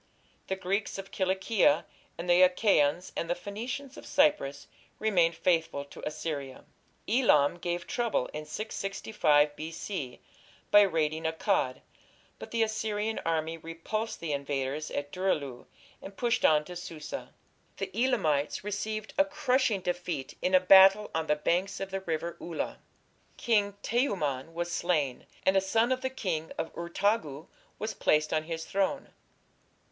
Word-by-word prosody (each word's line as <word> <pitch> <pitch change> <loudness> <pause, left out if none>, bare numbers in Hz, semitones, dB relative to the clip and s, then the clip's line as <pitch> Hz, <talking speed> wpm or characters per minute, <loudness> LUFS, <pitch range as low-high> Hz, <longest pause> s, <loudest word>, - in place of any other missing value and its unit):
The 190 - -1
Greeks 195 +3 -2
of 195 0 -8
Cilicia, 190 +8 +2 0.3
and 170 +2 -5
the 175 +1 +5
Achaeans 180 -3 +3
and 170 - -3
Phoenicians 245 +8 -6
of - - -10
Cyprus 265 - +2 0.3
remained 175 -6 +2
faithful 160 -4 0
to 140 - -12
Assyria. 150 -3 -5 0.4
Elam 175 - +4
gave 175 0 -3
trouble 235 - 0
in 150 0 -6
665 195 -6 +1
B.C. 155 -3 -5 0.5
by 205 - +9
raiding 160 -4 +1
Akkad, 160 -5 0 0.6
but - - -8
the 230 -1 +1
Assyrian 220 0 -1
army 165 0 -1
repulsed 165 +8 -4
the 160 -3 -2
invaders 140 +1 -2
at 145 0 -4
Dur 185 +1 +1
ilu 135 -5 -6 0.3
and 195 0 -10
pushed 240 -1 +1
on 150 -1 +5
to 180 - -8
Susa. 175 - -7 0.5
The 195 -1 -4
Elamites 190 - +1
received 215 +1 -4
a 290 - +6
crushing 260 -8 +1
defeat 175 -6 -3
in 185 +1 +2
a - - +8
battle 195 +3 +7
on 160 0 -1
the 150 - +3
banks 175 +6 0
of 195 0 -5
the 195 0 -3
River 170 -1 -3
Ula. 170 -2 -4 0.6
King 205 -4 +2
Teumman 165 - -1
was 175 0 -2
slain, 155 -8 0 0.2
and 190 - +4
a 195 - +5
son 225 +6 +2
of 255 0 0
the 260 - -1
King 180 -11 -3
of 160 - -4
Urtagu 170 -3 -1 0.3
was 215 +1 -3
placed 155 -5 +2
on 155 0 0
his 160 0 -4
throne. 200 +8 -1
180 Hz, 145 wpm, -29 LUFS, 155-210 Hz, 0.6 s, by